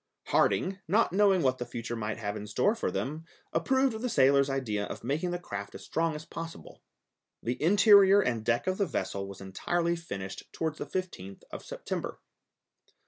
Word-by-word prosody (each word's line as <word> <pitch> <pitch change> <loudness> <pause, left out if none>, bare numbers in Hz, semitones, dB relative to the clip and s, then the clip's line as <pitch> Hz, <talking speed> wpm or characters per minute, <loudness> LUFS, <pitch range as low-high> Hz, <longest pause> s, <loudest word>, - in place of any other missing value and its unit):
Harding, 190 +1 +2
not 205 +2 +3
knowing 195 -3 +4
what 130 -1 +2
the 120 - -3
future 120 0 -5
might 105 -1 -3
have 105 -2 -3
in 105 0 -6
store 205 - +2
for 230 - -2
them, 155 +4 -3 0.3
approved 260 +6 +2
the 250 - -1
sailor's 140 - +4
idea 120 -7 -1
of - - -7
making 155 +6 -1
the 175 - -1
craft 100 - -7
as - - -9
strong 165 -1 0
as 150 +1 -7
possible. 165 0 -8 0.6
The 120 +2 -2
interior 200 +3 +7
and 120 - 0
deck 115 +1 +1
of 185 +1 -1
the 200 - +2
vessel 100 -9 -3
was 100 0 -10
entirely 170 - -1
finished 100 - -7
towards 160 -1 -3
the - - -4
15th 100 - -5
of - - -7
September. - - -5
155 Hz, 180 wpm, -29 LUFS, 115-185 Hz, 0.6 s, interior